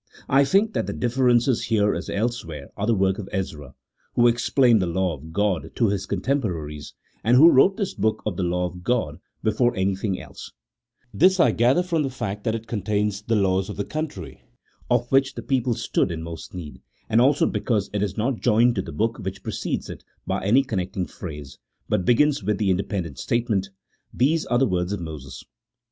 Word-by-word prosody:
I 140 Hz, +1 st, +4 dB
think 200 Hz, +8 st, +2 dB
that -, -, -1 dB
the -, -, -3 dB
differences 125 Hz, 0 st, +2 dB
here 105 Hz, -2 st, +2 dB
as -, -, -5 dB
elsewhere 100 Hz, -, -3 dB
are 105 Hz, +1 st, -2 dB
the 115 Hz, -, +3 dB
work 95 Hz, +1 st, +1 dB
of 100 Hz, -, -7 dB
Ezra, 75 Hz, -8 st, -5 dB, 0.4 s
who 120 Hz, -, +4 dB
explained 120 Hz, -1 st, +3 dB
the 90 Hz, -, 0 dB
law 90 Hz, +1 st, 0 dB
of 80 Hz, +2 st, -10 dB
God 100 Hz, 0 st, 0 dB
to 115 Hz, -4 st, +2 dB
his 100 Hz, -1 st, -2 dB
contemporaries, 90 Hz, -, -3 dB, 0.3 s
and 120 Hz, +3 st, +4 dB
who 165 Hz, +5 st, +8 dB
wrote 190 Hz, +9 st, +5 dB
this 200 Hz, -4 st, -2 dB
book 110 Hz, 0 st, -1 dB
of 105 Hz, -4 st, -2 dB
the 95 Hz, -, -3 dB
law 90 Hz, 0 st, 0 dB
of 90 Hz, 0 st, -7 dB
God, 95 Hz, -9 st, -1 dB, 0.2 s
before 120 Hz, +3 st, +2 dB
anything 95 Hz, 0 st, -1 dB
else; -, -, -10 dB, 0.6 s
this 185 Hz, -, +4 dB
I 125 Hz, -7 st, +5 dB
gather 125 Hz, +10 st, +3 dB
from 170 Hz, -3 st, 0 dB
the 140 Hz, -, -1 dB
fact 105 Hz, -5 st, -5 dB
that 110 Hz, -, +1 dB
it 115 Hz, 0 st, -6 dB
contains 105 Hz, -2 st, -1 dB
the 115 Hz, +2 st, 0 dB
laws 95 Hz, -1 st, +1 dB
of 105 Hz, -, -6 dB
the 100 Hz, -, -2 dB
country, 155 Hz, 0 st, -6 dB, 0.5 s
of 120 Hz, 0 st, +2 dB
which 135 Hz, 0 st, +3 dB
the -, -, -6 dB
people 130 Hz, -3 st, 0 dB
stood -, -, 0 dB
in 80 Hz, -1 st, -5 dB
most 85 Hz, +2 st, -8 dB
need, 80 Hz, -5 st, -8 dB, 0.3 s
and 115 Hz, +1 st, +3 dB
also 135 Hz, +3 st, +4 dB
because 105 Hz, -5 st, -1 dB
it 105 Hz, -, -1 dB
is 105 Hz, 0 st, -2 dB
not 120 Hz, +2 st, -1 dB
joined 120 Hz, +1 st, +4 dB
to -, -, +2 dB
the -, -, -8 dB
book 115 Hz, +2 st, -1 dB
which 95 Hz, -1 st, -6 dB
precedes -, -, -3 dB
it -, -, -9 dB, 0.2 s
by -, -, -2 dB
any 120 Hz, +8 st, +4 dB
connecting 95 Hz, -5 st, -3 dB
phrase, 75 Hz, -7 st, -9 dB, 0.3 s
but 90 Hz, -, 0 dB
begins 145 Hz, +3 st, +3 dB
with 105 Hz, +1 st, 0 dB
the 100 Hz, -1 st, +1 dB
independent 90 Hz, -, -2 dB
statement, 110 Hz, -, 0 dB, 0.2 s
" -, -, -44 dB
these 155 Hz, +6 st, +1 dB
are 120 Hz, -, +2 dB
the 135 Hz, -, +4 dB
words 90 Hz, -3 st, -1 dB
of 100 Hz, -, -3 dB
Moses." 70 Hz, -6 st, -8 dB
105 Hz, 200 wpm, -24 LUFS, 95-120 Hz, 0.6 s, who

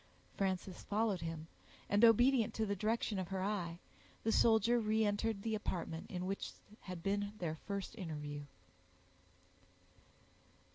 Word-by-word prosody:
Frances 190 Hz, -1 st, -1 dB
followed 210 Hz, -3 st, 0 dB
him, 165 Hz, -1 st, -4 dB, 0.4 s
and, 205 Hz, +2 st, +3 dB
obedient 235 Hz, +1 st, +6 dB
to 220 Hz, -, +1 dB
the 200 Hz, -1 st, 0 dB
direction 215 Hz, 0 st, 0 dB
of 185 Hz, -, -2 dB
her 190 Hz, -1 st, -2 dB
eye, 180 Hz, -5 st, -1 dB, 0.5 s
the 225 Hz, -, +2 dB
soldier 230 Hz, +1 st, +5 dB
reentered 215 Hz, -1 st, +1 dB
the 225 Hz, -, -1 dB
apartment 170 Hz, -6 st, -3 dB
in 180 Hz, 0 st, -3 dB
which 195 Hz, +1 st, -3 dB, 0.3 s
had 180 Hz, -3 st, -7 dB
been 205 Hz, +1 st, 0 dB
their 170 Hz, -6 st, -2 dB
first 200 Hz, +6 st, -5 dB
interview. 150 Hz, -7 st, -5 dB
200 Hz, 130 wpm, -37 LUFS, 180-220 Hz, 0.5 s, obedient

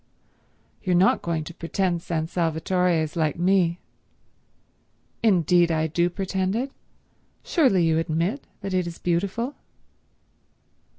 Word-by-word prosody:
"You're 185 Hz, -3 st, +1 dB
not 185 Hz, +3 st, +4 dB
going 165 Hz, -2 st, -2 dB
to 170 Hz, -, -9 dB
pretend 175 Hz, +1 st, -1 dB
San 160 Hz, -2 st, -2 dB
Salvatore 175 Hz, +2 st, 0 dB
is 155 Hz, -, -6 dB
like 155 Hz, -2 st, 0 dB
me?" 180 Hz, -1 st, +2 dB, 1.4 s
"Indeed 175 Hz, -5 st, +4 dB
I 160 Hz, -1 st, +1 dB
do 170 Hz, +3 st, +1 dB
pretend 190 Hz, +1 st, -2 dB
it. 260 Hz, +4 st, -2 dB, 0.7 s
Surely 245 Hz, -, +3 dB
you 160 Hz, 0 st, +2 dB
admit 165 Hz, -, -1 dB
that 195 Hz, -1 st, -4 dB
it 180 Hz, -2 st, +1 dB
is 170 Hz, -, -7 dB
beautiful?" 200 Hz, +9 st, -1 dB
175 Hz, 120 wpm, -24 LUFS, 165-190 Hz, 1.4 s, not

